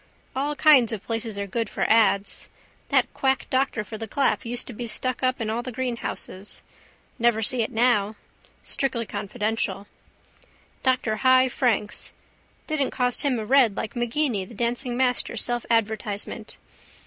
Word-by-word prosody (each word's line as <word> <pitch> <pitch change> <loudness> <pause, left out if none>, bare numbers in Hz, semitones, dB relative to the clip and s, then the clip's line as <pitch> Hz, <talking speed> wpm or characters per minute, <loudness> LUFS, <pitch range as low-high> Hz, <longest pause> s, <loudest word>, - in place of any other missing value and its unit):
All 285 +3 -1
kinds 285 -7 +6
of 215 -3 -4
places 225 -2 -3
are 200 - -2
good 225 +2 -2
for - - -1
ads. 215 -3 +2 0.4
That - - +2
quack 265 -1 +1
doctor 260 -4 +1
for 210 +2 -8
the 225 - -4
clap 270 +3 +1
used 245 +1 -2
to 245 - -8
be 235 +2 -5
stuck 255 +2 0
up 255 0 +1
in 225 - -2
all 225 +2 -1
the 255 +1 -6
greenhouses. 235 -5 -5 0.6
Never 235 -1 +3
see 245 +3 +3
it 225 - -1
now. 220 -3 +2 0.5
Strictly 245 -4 0
confidential. 205 0 -2 1.0
Dr 255 -4 +1
Hy 260 0 +5
Franks. 225 -5 -1 0.5
Didn't 305 -4 0
cost 250 -1 +1
him 275 -4 +3
a 220 - -3
red 245 -4 +4
like 220 - -4
Maginni 240 -2 0
the 205 +5 -12
dancing 240 +2 -1
master 250 -1 +1
self 240 -1 -1
advertisement. 220 -1 -1
235 Hz, 155 wpm, -25 LUFS, 215-255 Hz, 1.0 s, kinds